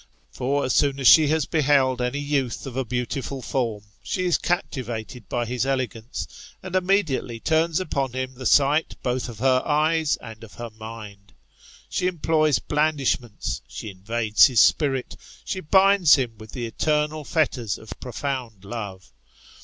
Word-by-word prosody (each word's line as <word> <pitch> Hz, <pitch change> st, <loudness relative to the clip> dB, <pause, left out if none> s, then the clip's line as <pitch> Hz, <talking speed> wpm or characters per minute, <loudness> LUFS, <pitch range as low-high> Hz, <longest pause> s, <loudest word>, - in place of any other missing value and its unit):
For 140 Hz, +3 st, -1 dB
as 130 Hz, -, 0 dB
soon 140 Hz, -1 st, +2 dB
as 135 Hz, -, +3 dB
she 155 Hz, +3 st, +8 dB
has 155 Hz, -1 st, +1 dB
beheld 140 Hz, -5 st, +2 dB
any 125 Hz, +3 st, -1 dB
youth 145 Hz, -4 st, -2 dB
of 130 Hz, -3 st, -7 dB
a 135 Hz, -, 0 dB
beautiful 125 Hz, +3 st, -3 dB
form, 115 Hz, -5 st, -2 dB, 0.2 s
she 185 Hz, -, -2 dB
is 175 Hz, -, +2 dB
captivated 125 Hz, -, -3 dB
by 120 Hz, -1 st, -1 dB
his 125 Hz, +2 st, -2 dB
elegance, 130 Hz, -3 st, -3 dB, 0.4 s
and 185 Hz, 0 st, -5 dB
immediately 180 Hz, -, +1 dB
turns 160 Hz, +4 st, +1 dB
upon 140 Hz, -8 st, -2 dB
him 130 Hz, 0 st, -3 dB
the 130 Hz, 0 st, -3 dB
sight 145 Hz, +3 st, +3 dB
both 125 Hz, 0 st, -1 dB
of 115 Hz, -, -9 dB
her 130 Hz, +2 st, +3 dB
eyes 155 Hz, 0 st, +2 dB
and 115 Hz, -1 st, -11 dB
of 110 Hz, -, -13 dB
her 120 Hz, -1 st, -7 dB
mind. 110 Hz, -2 st, -10 dB, 0.5 s
She 180 Hz, -, -1 dB
employs 155 Hz, -4 st, +2 dB
blandish 150 Hz, -3 st, +1 dB
ments, 105 Hz, -, -6 dB
she 110 Hz, -, -7 dB
invades 110 Hz, +3 st, +3 dB
his 125 Hz, -4 st, +2 dB
spirit, 135 Hz, -4 st, +2 dB, 0.3 s
she 190 Hz, -, -3 dB
binds 190 Hz, 0 st, +5 dB
him 125 Hz, -5 st, -2 dB
with 110 Hz, -1 st, -12 dB
the 120 Hz, -2 st, -4 dB
eternal 150 Hz, +5 st, -1 dB
fetters 130 Hz, -, 0 dB
of 110 Hz, -, -9 dB
profound 125 Hz, -5 st, -5 dB
love. 100 Hz, -4 st, -7 dB
130 Hz, 160 wpm, -24 LUFS, 115-150 Hz, 0.5 s, she